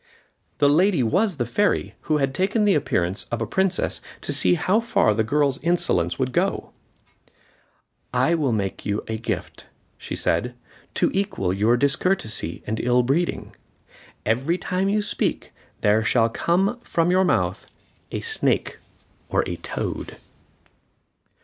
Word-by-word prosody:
The 145 - +4
lady 170 0 +3
was 185 - +1
the 120 - -1
fairy, 205 - 0
who 155 - +2
had 135 -2 0
taken 205 +6 +1
the 205 - +4
appearance 95 - 0
of 120 - -4
a 115 - -1
princess 190 - 0 0.2
to - - -3
see 90 -1 +3
how 200 - +2
far 230 - +2
the 110 +1 +1
girl's 140 +3 +1
insolence 175 +2 +1
would - - -1
go. - - -1 1.4
"I 130 +6 +2
will 150 -6 +1
make 100 -4 -2
you 105 0 -2
a 110 0 -3
gift," 110 -6 -5 0.3
she - - -6
said, 125 0 -1 0.4
"to - - +2
equal 190 - -1
your 110 +5 +2
discourtesy 135 - +1
and 110 +1 -3
ill 125 0 +2
breeding. 150 +8 -1 0.7
Every 135 +11 +1
time 185 +1 -1
you 210 +1 +1
speak, - - -2 0.3
there 105 +1 +3
shall 115 +1 +3
come 190 - 0
from 170 -6 0
your 185 +1 +4
mouth - - 0 0.4
a - - -3
snake 440 -1 0 0.5
or - - +2
a - - -4
toad." - - -5
140 Hz, 145 wpm, -23 LUFS, 110-185 Hz, 1.4 s, The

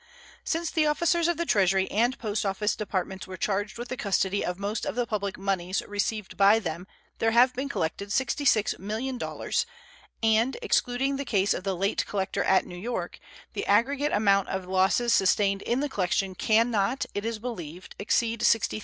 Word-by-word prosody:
Since 330 0 -1
the 310 -2 +2
officers 340 +2 +2
of 345 -2 0
the 340 - -1
Treasury 190 - +3
and 240 +5 +1
Post 215 0 -2
Office 205 +1 0
Departments 190 -2 -3
were 185 0 -7
charged 205 +4 -2
with 240 +1 -6
the 255 - -3
custody 200 -2 0
of 180 0 -3
most 205 +2 -3
of - - -3
the 245 -1 0
public 200 -4 -3
moneys 190 -1 -1
received 205 0 -3
by 200 +2 +6
them 175 -3 -4 0.3
there 225 - +3
have 245 +3 +5
been 265 +3 -3
collected 200 0 -3
$66,000,000, 240 -1 0 0.6
and, 225 +3 +3
excluding 265 +3 +1
the 280 - -3
case 200 -6 +1
of - - -5
the 195 -1 -1
late 195 +3 0
collector 200 0 -1
at 190 - +3
New 180 - -9
York, 240 +6 -4 0.3
the - - -3
aggregate 275 +8 +2
amount 200 -2 +3
of 190 -1 -3
losses 190 +6 +2
sustained 195 0 +3
in 245 +3 0
the 295 - 0
collection 190 -3 0
can 225 +5 +2
not, 225 +5 0
it 205 - -3
is 225 0 -2
believed, 185 -7 -7
exceed 230 +2 0
$60,000. 225 -2 +2
210 Hz, 180 wpm, -27 LUFS, 195-245 Hz, 0.6 s, by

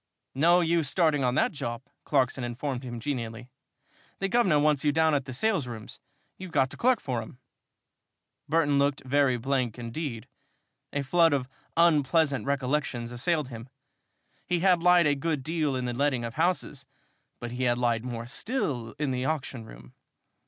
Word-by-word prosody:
"No 170 +6 +4
use 165 -3 +1
starting 155 -5 +2
on 125 0 +1
that - - +2
job," 120 -4 -5 0.2
Clarkson 130 -2 +1
informed 125 +2 -3
him, 120 -2 -6
genially. 120 -2 -5 0.7
"The 195 - -2
guvnor 195 -9 +3
wants 150 -1 +2
you 150 - +3
down 160 +1 +3
at 140 -2 0
the 130 - -7
salesrooms, 125 - -2 0.4
you've 185 -2 -8
got 135 -3 +2
to - - -8
clerk 250 -1 +3
for 125 -4 -3
him." 110 +3 -11 1.1
Burton 145 -3 +3
looked 140 0 +1
very 135 -1 +2
blank 125 -2 -1
indeed. 120 0 -5 0.6
A 145 - -2
flood 165 +3 +4
of 130 -3 0 0.3
unpleasant 150 -5 +3
recollections 135 -3 -1
assailed 150 +3 0
him. 115 0 -9 0.8
He 175 -1 0
had 180 -2 +4
lied 180 -1 +5
a 145 - +4
good 145 0 -2
deal 155 -2 -1
in 125 -1 -2
the 120 - -2
letting 130 -2 0
of 115 - -5
houses, 160 -3 -1 0.6
but 120 -1 -6
he 125 +1 -2
had 120 -1 +2
lied 120 -2 +1
more 120 -2 -5
still 135 - -3
in 145 -3 -1
the 125 0 -2
auction 135 -6 -3
room. - - -14
140 Hz, 165 wpm, -27 LUFS, 125-160 Hz, 1.1 s, lied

